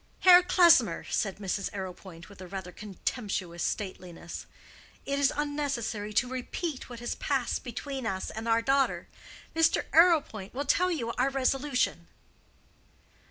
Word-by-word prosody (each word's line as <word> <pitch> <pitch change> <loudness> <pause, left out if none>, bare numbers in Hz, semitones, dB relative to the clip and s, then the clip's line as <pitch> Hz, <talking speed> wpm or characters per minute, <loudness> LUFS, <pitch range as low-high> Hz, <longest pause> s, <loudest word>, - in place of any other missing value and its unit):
"Herr 360 -1 +9
Klesmer," 340 - +5
said 195 -3 -1
Mrs. 195 -1 -2
Arrowpoint, 185 -2 -8
with 200 -2 -14
a 185 - -8
rather 190 -1 -6
contemptuous 195 -3 -4
stateliness, 180 -4 -5 0.6
"it 280 0 -1
is 280 - +3
unnecessary 275 -8 -2
to 235 +4 +2
repeat 260 +4 -5
what 240 -1 -9
has 240 - -2
passed 265 -4 -1
between 260 +1 -5
us 190 -3 -3
and 220 +1 -6
our 230 0 +2
daughter. 270 +2 +1 0.5
Mr. 325 0 +3
Arrowpoint 310 - +3
will 285 +2 -2
tell 360 +6 +2
you 250 -10 -2
our 265 +2 +3
resolution." 270 0 0
240 Hz, 135 wpm, -29 LUFS, 195-280 Hz, 0.6 s, Herr